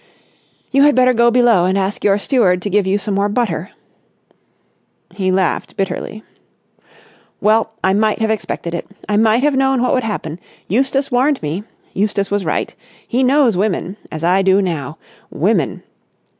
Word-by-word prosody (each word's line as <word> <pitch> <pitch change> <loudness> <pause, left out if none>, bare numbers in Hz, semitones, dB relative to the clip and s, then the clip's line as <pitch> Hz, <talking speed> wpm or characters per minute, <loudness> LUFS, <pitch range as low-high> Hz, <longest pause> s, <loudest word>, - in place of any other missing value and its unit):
"You 275 - +3
had 290 0 +5
better 255 0 +4
go 235 0 +4
below 235 -7 +3
and 190 +2 +1
ask 195 +1 -2
your 200 -1 +3
steward 200 -6 +1
to 205 - -3
give 200 -1 +2
you 195 +1 +2
some 205 0 -3
more 200 +1 +1
butter." 200 -6 -2 1.4
He 185 -2 -1
laughed 185 -1 -1
bitterly. 195 +3 -4 1.2
"Well, 220 +2 +2
I 190 - +3
might 215 +1 +1
have 220 0 0
expected 185 -5 -4
it. 170 - -4 0.2
I 210 - +1
might 225 +3 +3
have 295 -1 +2
known 265 -1 +2
what 250 - +1
would 255 - +2
happen! 180 -7 -4 0.3
Eustace 270 +6 0
warned 260 +3 +2
me. 165 +8 -3 0.3
Eustace 200 0 -1
was 205 -1 0
right. 155 - -2 0.3
He 250 +2 0
knows 260 -4 +3
women—as 185 -4 -3
I 180 +3 +3
do 190 0 +3
now. 160 -6 -3 0.3
Women! - - -1
205 Hz, 160 wpm, -17 LUFS, 190-245 Hz, 1.4 s, had